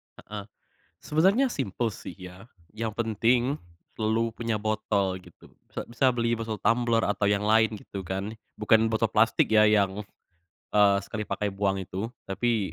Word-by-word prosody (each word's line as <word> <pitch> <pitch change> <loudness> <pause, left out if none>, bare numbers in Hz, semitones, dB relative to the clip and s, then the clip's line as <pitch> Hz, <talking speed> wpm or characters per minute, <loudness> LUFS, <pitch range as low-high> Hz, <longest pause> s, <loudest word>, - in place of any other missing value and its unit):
Heeh. 105 -1 -8 0.6
Sebenernya 195 - +3
simpel 115 - -2
sih - - -9
ya, 95 +3 -11 0.2
yang 110 0 -4
penting 120 +5 +1 0.3
selalu 110 +1 0
punya 115 -1 -2
botol 105 -3 -1
gitu - - -18 0.2
sa - - -5
bisa 120 +3 +2
beli 115 0 +1
botol 115 -2 -3
tumbler 115 +1 +2
atau 100 0 +1
yang 100 0 +1
lain 110 0 +3
gitu 100 -1 -8
kan 95 +3 -4 0.2
bukan 110 +1 +4
botol 110 0 +1
plastik 110 0 +3
ya 105 0 +6
yang, 100 -1 +2 0.7
eee, 100 -1 +5
sekali 105 +1 -5
pakai 105 -1 -1
buang 95 0 0
itu 95 +4 -4 0.2
tapi 110 0 -1
110 Hz, 150 wpm, -27 LUFS, 100-115 Hz, 0.7 s, ya